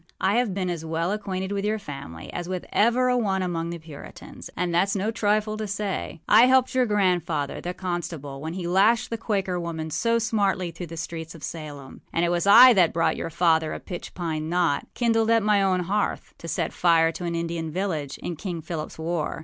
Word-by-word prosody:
I 195 Hz, +4 st, +2 dB
have 235 Hz, -6 st, 0 dB
been 185 Hz, -2 st, -1 dB
as 165 Hz, -2 st, -4 dB
well 165 Hz, +3 st, -1 dB
acquainted 190 Hz, -2 st, -3 dB
with 200 Hz, -1 st, -2 dB
your 215 Hz, +1 st, 0 dB
family 135 Hz, -, -9 dB
as 175 Hz, 0 st, -4 dB
with 185 Hz, -1 st, -3 dB
ever 240 Hz, +4 st, +3 dB
a 250 Hz, -, +3 dB
one 195 Hz, -6 st, 0 dB
among 170 Hz, -2 st, -2 dB
the 170 Hz, -, -4 dB
Puritans; 155 Hz, -3 st, -11 dB
and 175 Hz, 0 st, -1 dB
thatâs 190 Hz, +4 st, +2 dB
no 205 Hz, +3 st, 0 dB
trifle 215 Hz, -1 st, 0 dB
to 215 Hz, -1 st, -3 dB
say. 200 Hz, -5 st, -4 dB
I 225 Hz, +4 st, +7 dB
helped 260 Hz, 0 st, +3 dB
your 255 Hz, -1 st, +2 dB
grandfather, 175 Hz, -8 st, 0 dB
the 180 Hz, +1 st, -4 dB
constable, 165 Hz, -6 st, -5 dB
when 160 Hz, +3 st, -5 dB
he 185 Hz, -2 st, -4 dB
lashed 215 Hz, +7 st, +3 dB
the 230 Hz, -, -1 dB
Quaker 195 Hz, -4 st, -1 dB
woman 160 Hz, -2 st, -4 dB
so 230 Hz, +7 st, +1 dB
smartly 200 Hz, -6 st, 0 dB
through 170 Hz, +1 st, -7 dB
the 165 Hz, +1 st, -9 dB
streets 165 Hz, 0 st, -6 dB
of 155 Hz, -, -13 dB
Salem; 145 Hz, -4 st, -8 dB
and 170 Hz, -, +1 dB
it -, -, +1 dB
was 175 Hz, +2 st, 0 dB
I 245 Hz, +5 st, +10 dB
that 180 Hz, -6 st, +3 dB
brought 165 Hz, -, +1 dB
your -, -, -4 dB
father 160 Hz, -2 st, +2 dB
a -, -, -5 dB
pitch 175 Hz, -2 st, -8 dB
pine 160 Hz, -3 st, -3 dB
knot, 170 Hz, -5 st, +1 dB
kindled 225 Hz, -2 st, +2 dB
at 230 Hz, -1 st, +4 dB
my 210 Hz, -1 st, +3 dB
own 185 Hz, -2 st, +2 dB
hearth, 200 Hz, +4 st, -2 dB
to 165 Hz, -, -8 dB
set 165 Hz, -1 st, -2 dB
fire 165 Hz, -2 st, +4 dB
to 175 Hz, -, -6 dB
an 170 Hz, -1 st, -2 dB
Indian 165 Hz, -1 st, -3 dB
village, 155 Hz, -5 st, -3 dB
in 175 Hz, -, -3 dB
King 170 Hz, -1 st, -5 dB
Philipâs 155 Hz, -2 st, -5 dB
war. 165 Hz, 0 st, -2 dB
180 Hz, 215 wpm, -25 LUFS, 165-205 Hz, -, I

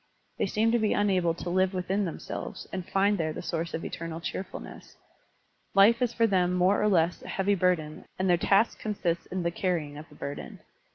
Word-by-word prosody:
They -, -, +1 dB
seem 220 Hz, +3 st, +2 dB
to 240 Hz, -, +3 dB
be 215 Hz, -1 st, +2 dB
unable 185 Hz, -5 st, +2 dB
to 175 Hz, -, -5 dB
live 185 Hz, +1 st, +2 dB
within 190 Hz, +3 st, 0 dB
themselves 165 Hz, -, -6 dB
and 185 Hz, -2 st, -5 dB
find 200 Hz, 0 st, +2 dB
there 155 Hz, -1 st, -1 dB
the -, -, -6 dB
source 165 Hz, -1 st, -3 dB
of 160 Hz, -, -5 dB
eternal 165 Hz, 0 st, -5 dB
cheerfulness. 185 Hz, +2 st, -7 dB, 0.8 s
Life 220 Hz, +5 st, +6 dB
is 245 Hz, -2 st, +2 dB
for 230 Hz, -1 st, +2 dB
them 180 Hz, -4 st, +2 dB
more 180 Hz, +3 st, +3 dB
or 210 Hz, -, +3 dB
less 175 Hz, -3 st, +2 dB
a -, -, -11 dB
heavy 195 Hz, +1 st, +1 dB
burden 175 Hz, -5 st, 0 dB
and 190 Hz, -, 0 dB
their 175 Hz, -, +5 dB
task 195 Hz, +6 st, +2 dB
consists 185 Hz, -5 st, -2 dB
in 185 Hz, -1 st, -3 dB
the 170 Hz, -, 0 dB
carrying 160 Hz, -5 st, -2 dB
of 155 Hz, 0 st, -12 dB
the 150 Hz, -, -16 dB
burden. 140 Hz, 0 st, -7 dB
185 Hz, 205 wpm, -28 LUFS, 170-200 Hz, 0.8 s, Life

